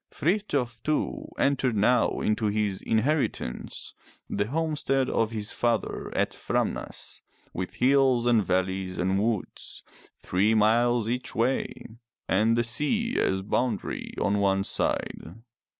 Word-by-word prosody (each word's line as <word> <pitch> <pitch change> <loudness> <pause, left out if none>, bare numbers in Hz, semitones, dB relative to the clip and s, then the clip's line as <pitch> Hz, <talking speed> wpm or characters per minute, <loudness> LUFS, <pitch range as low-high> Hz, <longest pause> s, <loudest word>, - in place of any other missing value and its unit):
Frith 200 +6 0
j - - +1
of 120 -3 -3
too, 155 +4 -1
entered 135 -4 +1
now 115 +4 +2
into 110 0 +1
his 105 -2 -1
inheritance 115 - -1 0.2
— - - -29
the 100 +1 0
home 160 +4 -1
stead 135 -2 +1
of 115 -1 +1
his 110 -2 -3
father 120 -2 -1
at - - +1
Framnas, - - -3 0.3
with 90 0 -4
hills 130 -2 +3
and 120 -3 +4
valleys 95 +1 -1
and 95 +2 +1
woods, 110 -2 -3 0.3
three 105 +5 +1
miles 115 +2 +3
each 125 +2 -3
way, 125 +4 -1 0.4
and 110 +4 +3
the 120 - +3
sea 150 - 0
as 95 0 +1
boundary 115 +1 -2
on 100 +1 +1
one 95 -1 +2
side. 85 -2 -1
115 Hz, 135 wpm, -27 LUFS, 100-130 Hz, 0.4 s, and